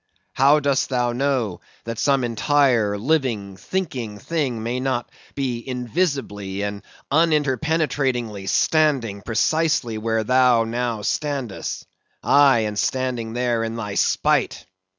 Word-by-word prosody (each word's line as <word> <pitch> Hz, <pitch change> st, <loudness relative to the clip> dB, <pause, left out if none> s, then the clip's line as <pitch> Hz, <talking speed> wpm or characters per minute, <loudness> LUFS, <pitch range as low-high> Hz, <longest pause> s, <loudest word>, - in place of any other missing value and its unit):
How 140 Hz, +3 st, +5 dB
dost 140 Hz, -2 st, +1 dB
thou 125 Hz, -2 st, 0 dB
know 125 Hz, -6 st, -1 dB, 0.2 s
that 115 Hz, -1 st, -5 dB
some 140 Hz, -2 st, +2 dB
entire, 120 Hz, -3 st, +2 dB
living, 115 Hz, -6 st, -1 dB
thinking 125 Hz, -, -4 dB
thing 130 Hz, -3 st, -2 dB
may 120 Hz, +2 st, -2 dB
not 130 Hz, -2 st, -1 dB, 0.3 s
be 125 Hz, -4 st, -2 dB
invisibly 125 Hz, -, -2 dB
and 100 Hz, 0 st, -4 dB, 0.3 s
uninterpenetratingly 140 Hz, -8 st, +1 dB
standing 135 Hz, -10 st, +2 dB
precisely 120 Hz, 0 st, 0 dB
where 110 Hz, 0 st, 0 dB
thou 125 Hz, 0 st, +4 dB
now 115 Hz, -1 st, -2 dB
standest; 140 Hz, -4 st, -3 dB, 0.4 s
aye, 140 Hz, -5 st, +5 dB
and 105 Hz, -1 st, -2 dB
standing 125 Hz, -4 st, -1 dB
there 120 Hz, -2 st, 0 dB
in 115 Hz, 0 st, -3 dB
thy 105 Hz, -3 st, -4 dB
spite? -, -, +1 dB
125 Hz, 115 wpm, -22 LUFS, 110-140 Hz, 0.4 s, How